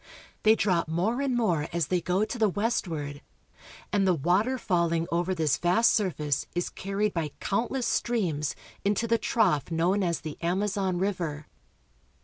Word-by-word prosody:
They 220 +1 +6
drop 180 -7 +1
more 190 - 0
and 270 -3 0
more 170 -10 +1
as 170 -1 -1
they 180 -1 +1
go 185 +5 +1
to 240 - -6
the 215 -2 +4
westward, 170 -9 -2 0.7
and 200 -2 +3
the 185 - +4
water 185 - +1
falling 170 -6 +1
over 175 +2 0
this 155 -4 +1
vast 180 +7 +3
surface 155 - 0
is 175 - -1
carried 200 +1 -2
by 155 -4 -2
countless 240 +5 -1
streams 170 -11 0 0.3
into 205 +3 +1
the 230 0 +2
trough 165 - +1
known 175 +5 +1
as 170 -3 0
the 155 -1 -7
Amazon 190 +1 0
river. 170 -6 -2
185 Hz, 155 wpm, -27 LUFS, 165-210 Hz, 0.7 s, They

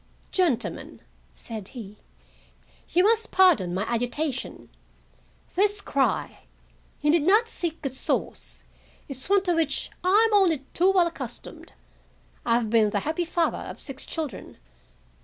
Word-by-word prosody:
"Gentlemen," 335 -11 -1 0.3
said 220 -4 -8
he, 210 -2 -9 0.9
"you 360 - +3
must 450 +2 +3
pardon 345 - +4
my 185 +3 -1
agitation. 245 +5 -3 0.8
This 410 +2 +2
cry—you 295 -1 -3
need 335 0 +4
not 420 +9 +4
seek 340 -7 -4
its 265 -1 -3
source—is 270 +2 -5
one 400 -1 +4
to 355 -2 +1
which 325 -4 0
I 410 +5 +5
am 445 - -3
only 335 -9 +3
too 370 +3 +4
well 370 -3 +4
accustomed. 340 - -7 0.7
I 230 - +2
have 230 -3 0
been 220 -2 +4
the 205 -1 -1
happy 320 +3 -2
father 335 0 0
of - - -8
six 275 -2 -6
children. 300 - -5
320 Hz, 130 wpm, -26 LUFS, 245-370 Hz, 0.9 s, I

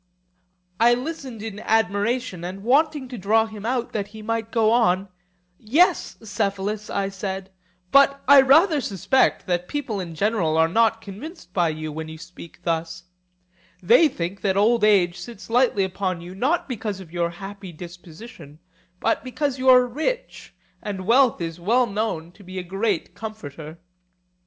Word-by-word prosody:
I 240 +1 +5
listened 260 -4 -6
in 215 -2 -6
admiration, 220 -1 0
and 185 +3 -6
wanting 285 +3 +2
to 245 -3 -7
draw 220 +4 +3
him 215 -1 -7
out, 245 -1 -1
that 205 -2 -3
he 215 +1 -11
might 225 0 -3
go 225 -2 +3
on—Yes, 185 - 0
Cephalus, 200 0 -2
I 200 -1 -1
said: 190 -1 -5 0.4
but 275 0 +5
I 280 0 +9
rather 300 +3 +5
suspect 220 +5 +1
that 180 -1 -1
people 260 -8 -3
in 170 -3 -6
general 175 -4 +1
are 160 0 +4
not 225 +4 +2
convinced 210 - -10
by 175 -4 +2
you 155 0 -5
when 160 +1 -6
you 160 - -9
speak 170 +1 -13
thus; 165 0 -2 0.8
they 460 -9 +6
think 180 - -5
that 195 -1 0
old 225 +2 +3
age 195 -4 +3
sits 235 -1 -10
lightly 240 -5 +3
upon 185 -1 -2
you, 175 +2 -9
not 270 - 0
because 220 -6 -4
of 180 -4 -12
your 170 -1 0
happy 195 +2 -9
disposition, 170 -1 -12 0.4
but - - 0
because 270 +1 -2
you 260 0 +3
are 250 -1 +7
rich, 320 - -4 0.3
and 195 -3 -5
wealth 245 +3 +4
is 165 0 -4
well 235 +8 +2
known 205 -6 -3
to 200 - -18
be 185 0 -9
a 185 - -3
great 195 +1 -2
comforter. 160 -8 -8
205 Hz, 160 wpm, -23 LUFS, 180-240 Hz, 0.8 s, I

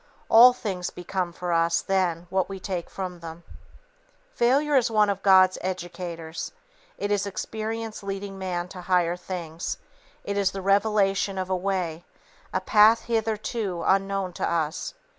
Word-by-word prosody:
All 240 +3 +9
things 195 -8 -4
become 180 0 -3
for 175 0 -3
us 165 0 +3
then 180 -3 0
what 190 0 0
we 195 -1 -6
take 185 -3 -4
from 180 -2 -6
them. 165 0 -9 0.9
Failure 280 +5 +2
is 250 -2 +4
one 210 -2 +3
of 195 -1 -4
God's 185 -1 +5
educators. 175 -3 -5 0.4
It 205 - -2
is 205 0 +1
experience 220 +2 -4
leading 195 0 -5
man 180 -2 -3
to 180 - -9
higher 175 -1 +2
things; 175 -2 -5 0.5
it 200 0 -3
is 195 -2 +3
the 195 - -4
revelation 195 -1 +2
of 185 0 -3
a - - +3
way, 180 -3 -2 0.5
a - - -1
path 220 +2 +5
hitherto 220 -4 -2
unknown 195 -1 +1
to - - -2
us. 165 - -2
190 Hz, 150 wpm, -25 LUFS, 175-205 Hz, 0.9 s, All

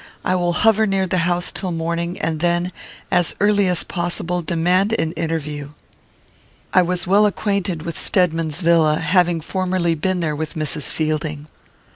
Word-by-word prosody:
I - - +2
will 175 -1 +1
hover 220 +2 +3
near 195 -1 +1
the 185 0 0
house 175 0 -1
till 190 - -3
morning, 170 +1 -3
and 160 -1 -2
then, 175 +2 0 0.4
as 175 -2 +2
early 205 -1 +3
as 180 -2 +1
possible, 175 0 -2
demand 180 +6 +1
an 160 -7 0
interview." 150 -3 -4 1.0
I 185 - +6
was 180 0 -1
well 200 +3 +4
acquainted 200 -5 -2
with 170 -1 -5
Stedman's 165 -3 +1
villa, 165 -3 +4
having 175 -1 +2
formerly 185 0 0
been 185 +3 -1
there 155 -3 -1
with 155 +1 -5
Mrs. 155 -2 -2
Fielding. 155 -1 -2
175 Hz, 155 wpm, -20 LUFS, 160-185 Hz, 1.0 s, I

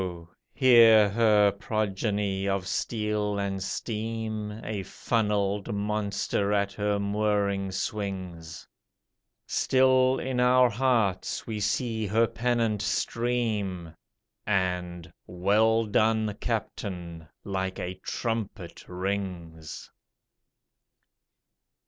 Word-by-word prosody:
here 115 -5 +7
her 105 -1 +4
progeny 100 -1 -2
of 95 -2 -1
steel 105 +1 -1
and 100 -1 -2
steam, 110 +1 -3
A 105 -2 -3
funnelled 105 +1 -1
monster 100 -1 -1
at 100 -1 +1
her 105 +1 0
mooring 100 -1 0
swings: 90 -5 -5 0.8
Still, 130 0 +3
in 130 -1 -2
our 125 0 +5
hearts, 115 -5 0
we 110 -2 -4
see 110 +1 -1
her 110 +4 +3
pennant 115 -3 0
stream, 105 -5 -1 0.5
And 90 -3 -1
"Well 110 +5 +2
done, 110 0 +2
'Captain'," 90 -7 -5 0.2
like 95 -1 -3
a 90 - -4
trumpet 110 -6 -4
rings. 90 -4 -5
105 Hz, 85 wpm, -27 LUFS, 95-110 Hz, 0.8 s, here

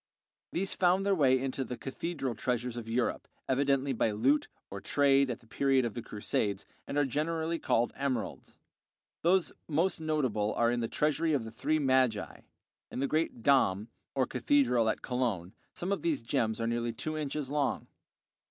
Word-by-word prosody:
These 190 +2 0
found 185 +2 +2
their 200 - +3
way 135 -7 +4
into 135 0 -2
the 125 -1 -6
cathedral 135 -1 -3
treasures 120 +1 -2
of 115 -2 -6
Europe, 120 +1 -1 0.2
evidently 135 0 +2
by 115 - +1
loot 130 +8 +2 0.2
or 100 0 -6
trade 140 -1 +3
at 120 - -4
the - - -21
period 135 +2 +2
of 115 - -3
the 120 - -5
Crusades, 105 -2 -2 0.2
and 140 - -3
are 145 - +4
generally 160 +4 -1
called 120 +1 +1
emeralds. 135 -3 -3 0.6
Those 180 +1 +3 0.2
most 165 +3 +1
notable 130 -10 0
are 120 0 +3
in 120 - 0
the 115 - -1
Treasury 155 +5 +1
of 135 -5 +1
the 110 - -7
Three 155 +7 0
Magi, 130 -6 +1 0.5
in - - -7
the 140 - +1
great 155 -6 -1
"Dom," 110 -6 +3 0.3
or 130 -1 +2
Cathedral 125 -3 +2
at - - -2
Cologne. 115 -9 -1 0.2
Some 180 +3 -4
of 200 - 0
these 155 -7 0
gems 110 -1 0
are 115 - -1
nearly 120 0 -1
two 155 +7 -4
inches 150 -2 -3
long. 145 -2 0
130 Hz, 175 wpm, -31 LUFS, 115-150 Hz, 0.6 s, way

